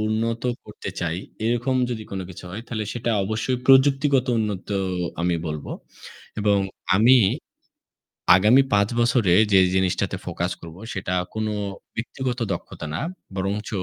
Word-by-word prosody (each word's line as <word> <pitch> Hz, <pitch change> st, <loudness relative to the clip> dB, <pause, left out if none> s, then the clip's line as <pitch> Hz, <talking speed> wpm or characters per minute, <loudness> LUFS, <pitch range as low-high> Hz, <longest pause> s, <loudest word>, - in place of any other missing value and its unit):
উন্নত 110 Hz, +2 st, -1 dB, 0.2 s
করতে 105 Hz, -2 st, -7 dB
চাই, 85 Hz, -1 st, -1 dB, 0.3 s
এরকম 120 Hz, +3 st, +1 dB
যদি 110 Hz, -2 st, -3 dB
কোনো 95 Hz, -1 st, -3 dB
কিছু 90 Hz, -, -10 dB
হয় 105 Hz, +5 st, -6 dB
তাহলে 110 Hz, -2 st, -3 dB
সেটা 120 Hz, -1 st, -2 dB
অবশ্যই 110 Hz, +5 st, -1 dB
প্রযুক্তিগত 135 Hz, 0 st, +5 dB
উন্নত 105 Hz, -4 st, -3 dB, 0.5 s
আমি 85 Hz, 0 st, +1 dB
বলবো 75 Hz, -1 st, -5 dB, 0.7 s
এবং 105 Hz, -1 st, +3 dB, 0.4 s
আমি 120 Hz, +6 st, +6 dB, 1.2 s
আগামী 110 Hz, +8 st, +6 dB
৫ 100 Hz, 0 st, +4 dB
বছরে 120 Hz, -6 st, +3 dB, 0.2 s
যে 95 Hz, -, +7 dB, 0.2 s
জিনিসটাতে 95 Hz, +1 st, 0 dB
focus 90 Hz, 0 st, -2 dB
করবো 85 Hz, +2 st, -10 dB
সেটা 95 Hz, -1 st, -3 dB, 0.2 s
কোনো 110 Hz, 0 st, -2 dB, 0.4 s
ব্যক্তিগত 125 Hz, +2 st, -3 dB
দক্ষতা 85 Hz, -, -7 dB
না। -, -, -2 dB, 0.3 s
বরঞ্চ 100 Hz, +2 st, -2 dB
110 Hz, 130 wpm, -23 LUFS, 95-120 Hz, 1.2 s, যে